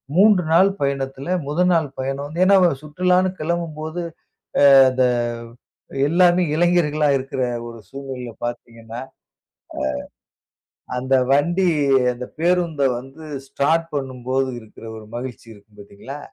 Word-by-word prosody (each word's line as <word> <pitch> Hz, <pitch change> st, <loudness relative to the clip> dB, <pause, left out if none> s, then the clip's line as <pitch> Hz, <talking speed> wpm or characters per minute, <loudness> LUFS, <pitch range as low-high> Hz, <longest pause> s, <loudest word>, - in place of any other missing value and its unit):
3 200 Hz, -1 st, +5 dB
நாள் 185 Hz, +4 st, +6 dB
பயணத்தில, 135 Hz, 0 st, -2 dB, 0.2 s
முதல் 180 Hz, +5 st, +1 dB
நாள் 160 Hz, -3 st, +2 dB
பயணம் 135 Hz, +2 st, -3 dB
வந்து 165 Hz, +4 st, -4 dB
ஏன்னா 195 Hz, +1 st, +6 dB, 0.3 s
சுற்றுலான்னு 180 Hz, +4 st, +1 dB
கிளம்பும்போது 160 Hz, 0 st, -3 dB, 0.7 s
அ -, -, +8 dB, 0.2 s
அந்த 130 Hz, 0 st, +1 dB, 1.0 s
எல்லாமே 175 Hz, +2 st, +4 dB
இளைஞர்களா 160 Hz, -3 st, +2 dB
இருக்கிற 130 Hz, 0 st, -4 dB, 0.2 s
ஒரு 115 Hz, -1 st, -9 dB
சூழ்நிலையில 135 Hz, -3 st, -7 dB
பாத்தீங்கன்னா, 115 Hz, -1 st, -7 dB
அ -, -, -44 dB, 1.8 s
அந்த 130 Hz, +2 st, 0 dB, 0.2 s
வண்டி 175 Hz, +6 st, +2 dB, 0.4 s
அந்த 125 Hz, +1 st, -7 dB
பேருந்த 170 Hz, -3 st, +1 dB, 0.2 s
வந்து 135 Hz, +5 st, -12 dB, 0.2 s
ஸ்டார்ட் 160 Hz, +5 st, +1 dB
பண்ணும்போது 130 Hz, -1 st, -2 dB
இருக்கிற 110 Hz, +1 st, -15 dB
1 110 Hz, -1 st, -11 dB
மகிழ்ச்சி 120 Hz, -2 st, -7 dB
இருக்கும் 105 Hz, 0 st, -21 dB
பாத்தீங்களா? 100 Hz, +8 st, -10 dB
140 Hz, 115 wpm, -21 LUFS, 130-170 Hz, 1.8 s, அ